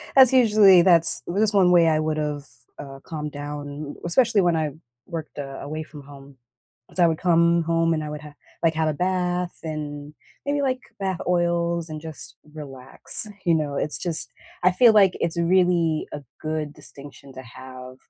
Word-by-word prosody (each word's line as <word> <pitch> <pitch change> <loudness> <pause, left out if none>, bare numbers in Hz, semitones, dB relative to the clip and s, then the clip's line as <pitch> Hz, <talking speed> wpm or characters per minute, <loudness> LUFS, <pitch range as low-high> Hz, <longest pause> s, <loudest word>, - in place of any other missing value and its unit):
That's 265 -2 +7
usually 210 -7 +6
that's 170 -1 +4
that's 205 +4 +1
one 190 -3 +4
way 170 -2 +5
I 155 -1 +2
would've, 150 -2 -2 0.3
uh, 135 -1 -9
calmed 150 -2 -6
down, 145 0 -7
especially 220 +4 +3
when 175 -2 +2
I 155 -2 -1 0.3
worked, 165 -4 -7
uh, 135 -1 -6
away 155 +2 -5
from 150 -1 -12
home. 140 -1 -14 0.6
So, 180 - +3
I - - +6
would 160 -1 0
come 170 -1 +3
home 165 0 +1
and 155 -1 -2
I 150 - -5
would 150 0 -7
ha 150 -1 -12 0.3
like, 165 -1 +2
have 160 0 +1
a - - -1
bath 180 +1 -1
and 150 -2 -6 0.3
maybe, 285 0 0
like, 260 -2 0 0.2
bath 190 -3 -2
oils 170 -1 0
and 155 0 -6
just 160 -2 -8 0.2
relax, 135 +5 -6 0.2
you 170 -2 +4
know? 150 -3 -2
It's 150 - -1
just 170 -3 -3 0.3
I 185 - +5
feel 230 +6 +6
like 200 -3 +6
it's 170 0 -2
really 170 -2 +2
a 150 - -6 0.2
good 155 -1 -3
distinction 140 0 -13
to 130 - -9
have 130 +1 -11
160 Hz, 180 wpm, -23 LUFS, 145-180 Hz, 0.6 s, That's